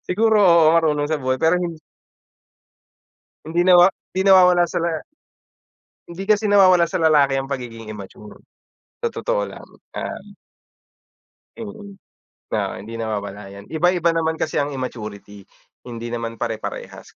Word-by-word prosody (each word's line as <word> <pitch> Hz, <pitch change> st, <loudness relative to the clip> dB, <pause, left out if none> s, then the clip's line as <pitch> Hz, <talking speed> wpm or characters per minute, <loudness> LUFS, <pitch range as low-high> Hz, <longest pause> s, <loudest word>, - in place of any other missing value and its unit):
Siguro 220 Hz, +3 st, +3 dB
oo 170 Hz, -4 st, +5 dB
marunong 150 Hz, -3 st, +2 dB
sa 155 Hz, -, -1 dB
buhay 130 Hz, 0 st, -1 dB
pero 170 Hz, +3 st, +2 dB
hin 170 Hz, -2 st, -5 dB, 1.7 s
Hindi 170 Hz, +3 st, 0 dB
nawa 180 Hz, +1 st, +7 dB, 0.2 s
hindi 190 Hz, -, 0 dB
nawawala 180 Hz, -2 st, +6 dB
sa 175 Hz, -, -2 dB
la 165 Hz, -2 st, -2 dB, 1.0 s
Hindi 185 Hz, +3 st, -8 dB
kasi 215 Hz, -1 st, +2 dB
nawawala 185 Hz, -3 st, +6 dB
sa 170 Hz, +2 st, -2 dB
lalaki 145 Hz, -4 st, +3 dB
ang 135 Hz, -, -5 dB
pagiging 120 Hz, -5 st, -6 dB
immature, 105 Hz, 0 st, -10 dB, 0.6 s
sa 470 Hz, -, -1 dB
totoo -, -, -1 dB
lang, -, -, -11 dB, 0.3 s
ah, -, -, -5 dB, 1.4 s
mm, 215 Hz, -2 st, -9 dB, 0.6 s
na -, -, -2 dB
hindi 115 Hz, +3 st, -8 dB
nawawala 105 Hz, -2 st, -5 dB
yan, 100 Hz, +1 st, -12 dB
iba-iba 170 Hz, +1 st, +2 dB
naman 160 Hz, -1 st, 0 dB
kasi 155 Hz, -, -2 dB
ang 145 Hz, 0 st, -1 dB
immaturity 105 Hz, -5 st, -7 dB, 0.4 s
hindi 120 Hz, -1 st, -7 dB
naman 115 Hz, -1 st, -4 dB
pare-parehas. 115 Hz, -2 st, -6 dB
160 Hz, 135 wpm, -21 LUFS, 115-180 Hz, 1.7 s, nawa